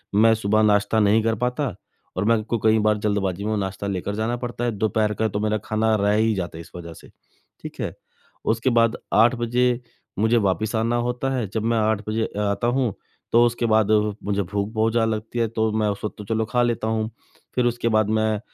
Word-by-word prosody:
मैं 110 +2 +6
सुबह 110 0 +1
नाश्ता 105 +1 +3
नहीं 110 +1 +4
कर 115 0 +1
पाता, 125 - -2 0.4
और 95 - -1
मेरे 115 -1 +3
को 115 +2 -1
कई 110 0 +4
बार 105 0 +2
जल्दबाजी 100 -2 -1
में 110 0 0
नाश्ता 95 0 -3
लेकर 100 +1 -3
जाना 110 +2 -1
पड़ता 120 0 -5
है। 120 - +1
दोपहर 105 0 0
का 110 +1 0
तो 100 0 -3
मेरा 110 0 0
खाना 110 0 +1
रह 105 0 +2
ही 110 0 +2
जाता 90 -3 -4
है 85 - -7
इस - - -14
वज़ह 85 -1 -8
से, - - -15 0.5
ठीक - - -9
है। - - -3 0.5
उसके 115 +3 +1
बाद 115 -2 +3 0.2
8 115 +3 +5
बजे 120 +1 +1 0.4
मुझे 110 +2 +3
वापस 105 +2 0
आना 115 +2 +1
होता 125 +2 -2
है। 120 -5 -1
जब 110 - -1
मैं 115 0 +1
8 110 -1 +1
बाजे 110 +1 0
आता 105 +3 0
हूँ, 125 -4 +1 0.4
तो 120 +1 +6
उसके 120 0 0
बाद 110 -1 +3 0.3
मुझे 100 0 0
भूख 100 +2 -2
बहुत 110 +1 +1
ज़्यादा 115 -1 +2
लगती 110 +2 -5
है, 115 - +2
तो 110 0 0
मैं 110 -1 0
उस 100 - -4
वक़्त - - -4
तो 105 - -7
चलो 110 +1 0
खा 125 -1 +2
लेता 115 -2 -1
हूँ। 110 0 -1 0.5
फिर 125 -1 +2
उसके 120 -1 0
बाद 110 -1 +2
मैं 110 -1 +1
110 Hz, 225 wpm, -23 LUFS, 105-115 Hz, 0.5 s, मैं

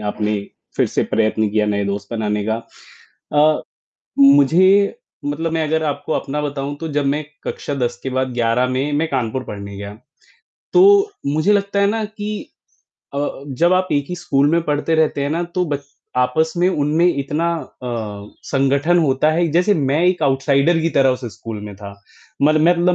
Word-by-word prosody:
आपने 105 0 -1 0.4
फिर - - +3
से - - -1
प्रयत्न 110 0 +1
किया 105 0 +1
नए 100 -1 0
दोस्त 100 0 -4
बनाने 105 -2 -1
का 110 - +1 0.8
अ, 150 +1 +3 0.6
मुझे 165 +9 +5 0.3
मतलब 155 +3 -2
मैं 160 -1 0
अगर 160 0 +1
आपको 150 +1 -3
अपना 150 0 -2
बताऊँ 145 0 -4
तो 165 - -4
जब 145 0 0
मैं 150 +2 0 0.2
कक्षा 145 - -4
10 120 -3 -2
के 130 - -3
बाद 130 0 -1
11 120 +1 +1
में 135 +3 -1
मैं 150 +3 +1
कानपुर 130 -2 -2
पढ़ने 100 -2 -8
गया, 100 +1 -7 0.8
तो 400 +3 +6 0.2
मुझे 155 +8 +2
लगता 200 0 +1
है 200 - +4
ना 220 +2 0
कि 210 0 -5 0.7
अ, - - -1 0.3
जब 165 +7 +2
आप 185 0 +2
एक 145 -1 0
ही 180 - -3
स्कूल 145 -4 +1
में 170 +1 +2
पढ़ते 150 +1 0
रहते 155 -2 +1
हैं 140 - -1
ना 165 +3 -1
तो 180 - +1
ब 145 - -1 0.4
आपस 125 +6 +1
में 180 +1 +3
उनमें 155 -1 +1
इतना 150 0 0 0.4
अ, - - -5 0.7
संगठन 140 +5 +2
होता 150 -1 +2
है 170 +2 +1
जैसे 180 +5 +3
मैं 145 -1 +1
एक 180 -2 +2
आउटसाइडर 140 +3 +2
की 165 +1 0
तरह 135 -3 +3
उस 125 0 -3
स्कूल 110 -2 -7
में 105 -1 -8
था, 100 0 -9 0.5
मल 155 +2 +4
मतलब 175 +1 +3
145 Hz, 180 wpm, -19 LUFS, 125-170 Hz, 0.8 s, तो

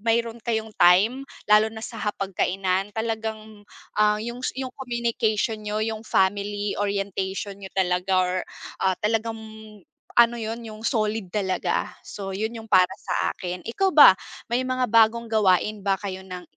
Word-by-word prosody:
mayro'n 230 +1 0
kayong 220 -1 -1
time 210 +10 +5 0.3
lalo 215 +1 +6
na 220 0 -8
sa 225 - -8
hapag-kainan, 195 -1 -1
talagang, 220 -1 -4 0.3
ah, 210 0 +4
yung 235 +2 -6
yung 260 -1 -4
communication 235 -3 -1
niyo, 210 +1 -1
yung 220 0 -3
family 205 +1 0
orientation 200 0 -2
niyo 190 -1 -9
talaga 180 0 0
or, 180 0 -1 0.5
ah, 190 -1 +3
talagang 225 +1 0 0.8
ano 235 0 +6
'yon, 230 0 -5
yung 215 0 -9
solid 215 -4 -1
talaga. 190 -3 -1
So, 195 -1 -7
yun 215 +3 -2
yung 225 - -9
para 185 -4 +5
sa - - -1
akin. 180 0 -5
Ikaw 380 +12 0
ba, 285 -11 +9 0.3
may 250 +2 0
mga 255 -2 -1
bagong 230 +1 +4
gawain 210 0 +2
ba 195 -1 +3
kayo 190 -1 -6
ng, 180 -1 -7
215 Hz, 150 wpm, -24 LUFS, 195-225 Hz, 0.8 s, ba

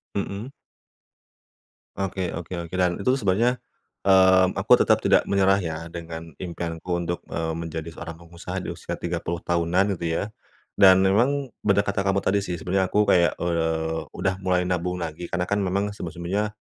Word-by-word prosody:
Mhm? 100 +5 -4 1.5
Oke 95 -2 -2
oke 90 +2 -7 0.2
oke. - - -29
Dan 90 -1 +2
itu 125 +6 +1
sebenarnya, 115 +5 +2 0.5
mmm, 95 -1 +5
aku - - +1
tetap - - +5
tidak - - +5
menyerah 95 0 +3
ya 80 -4 -3 0.2
dengan 85 -1 -7
impianku 85 0 -4
untuk, 85 +1 -3
eee, 80 -1 -2
menjadi 80 0 -5
seorang 85 0 -8
pengusaha 85 +2 -8
di - - -4
usia - - -6
30 85 0 -4
tahunan 85 +4 +1
itu 85 -1 -1
ya - - -1 0.5
dan 95 -1 +6
memang 125 +7 +2
benar 100 0 +2
kata 100 -1 -1
kamu 95 0 0
tadi 100 +1 +2
sih, 90 -3 -4
sebenarnya 95 +3 0
aku 105 +3 +3
kayak, 90 -4 +3
eee, 80 -1 -1
udah 95 - 0
mulai 90 -1 +1
nabung 90 0 -1
lagi, 85 +2 -6
karena 90 - -1
kan 100 +3 0
memang 100 +2 -1
sebelum-sebelumnya 95 +3 -3
90 Hz, 160 wpm, -24 LUFS, 85-100 Hz, 1.5 s, dan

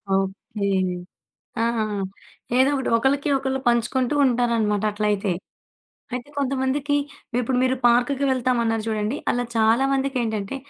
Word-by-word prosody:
Okay. 195 +1 -2 1.0
ఆ! - - +3 0.9
ఏదో 265 +1 +5
ఒకటి. 265 - -2
ఒకళ్ళకి 275 +4 +1
ఒకళ్ళు 265 0 -2
పంచుకుంటూ 240 +3 0
ఉంటారనమాట 230 -4 +1
అట్లయితే. 205 -2 0 0.8
అయితే 250 +3 -5
కొంతమందికి 275 +1 0 0.4
ఇప్పుడు 250 +1 0
మీరు 260 0 +2
పార్కుకి 245 +4 +3
వెళ్తామన్నారు 235 -4 +1
చూడండి, 215 +3 -1
అలా 245 0 +1
చాలామందికేంటంటే 240 -1 +1
245 Hz, 100 wpm, -23 LUFS, 220-265 Hz, 1.0 s, ఏదో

